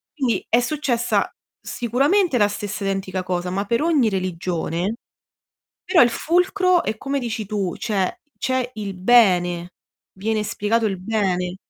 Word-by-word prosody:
Quindi 260 -6 0
è 235 - +4
successa 245 -2 0 0.3
sicuramente 275 - +1
la 205 -2 +4
stessa 205 0 -5
identica 190 -1 -2
cosa, 180 0 -2
ma 195 +2 -1
per 235 +6 0
ogni 305 -8 +3
religione, 180 0 -2 0.9
però 345 - +5
il 245 - +5
fulcro 360 +4 +2
è 220 - -2
come 275 +3 -2
dici 225 -4 -4
tu, 195 -4 -2
cioè 195 -5 -2 0.2
c'è 260 -1 -1
il 205 -3 -5
bene, 180 -4 +3 0.4
viene 215 +3 -1
spiegato 220 +2 0
il 195 -3 -3
bene. 185 -3 -1
215 Hz, 140 wpm, -22 LUFS, 185-245 Hz, 0.9 s, però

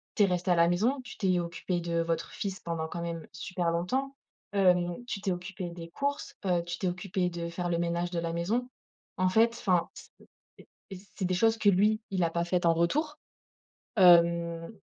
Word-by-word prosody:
tu 215 - +4
es - - +7
restée 180 -1 0
à - - +5
la 170 0 +5
maison, 225 +11 +1
tu - - -10
t'es 185 -4 +2
occupée 175 +1 -3
de 170 0 -1
votre 165 -1 -2
fils 195 -2 -4
pendant 165 -2 -3
quand 170 +1 -6
même 165 -2 -5
super 180 -1 -2
longtemps, 260 +12 -1 0.4
hem, 180 -3 +3
tu 200 -4 -4
t'es 195 - 0
occupée 180 0 -5
des 170 -1 -9
courses, 285 +10 -3
heu, 175 -2 +2
tu 175 0 -4
t'es 190 - -1
occupée 180 0 -1
de 170 -1 -5
faire 175 +1 -3
le 170 - +1
ménage 170 +1 -1
de 175 - -1
la 165 0 -2
maison. 220 +9 -1 0.5
En 185 -1 +2
fait, 225 +4 +4
enfin, 180 -3 +1
c - - -13 0.5
et - - -16 0.2
et 190 - -6 0.2
c'est 190 - -1
des 185 - 0
choses 225 +4 +3
que 215 -1 0
lui, 210 +3 +3
il 185 -2 +1
a 165 - +2
pas 170 0 -1
faites 175 0 0
en 165 - +5
retour, 295 - 0 0.8
hem 170 -2 +5
180 Hz, 210 wpm, -29 LUFS, 170-195 Hz, 0.8 s, es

